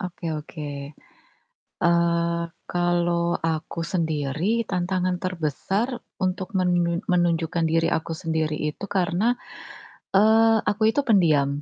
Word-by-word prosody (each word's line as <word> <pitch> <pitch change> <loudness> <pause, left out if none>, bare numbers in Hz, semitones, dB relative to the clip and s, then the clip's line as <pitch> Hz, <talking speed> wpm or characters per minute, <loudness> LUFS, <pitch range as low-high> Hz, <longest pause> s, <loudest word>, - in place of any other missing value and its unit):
Oke 180 -1 -6
oke. 150 0 -6 1.1
Eee, 170 0 +2 0.3
kalo 175 -1 +1
aku 160 +1 -2
sendiri 165 - -1
tantangan 180 0 -1
terbesar 185 - -2 0.2
untuk 185 0 -1
menun 175 -2 +1
menunjukkan 170 -2 +1
diri 165 +1 +2
aku 160 +1 -1
sendiri 160 -2 -1
itu 150 +6 -3
karena, 195 +5 +1 0.8
eee, 220 +2 +5
aku 215 +1 +2
itu 285 - +1
pendiam. 150 - +3
175 Hz, 105 wpm, -24 LUFS, 165-185 Hz, 1.1 s, eee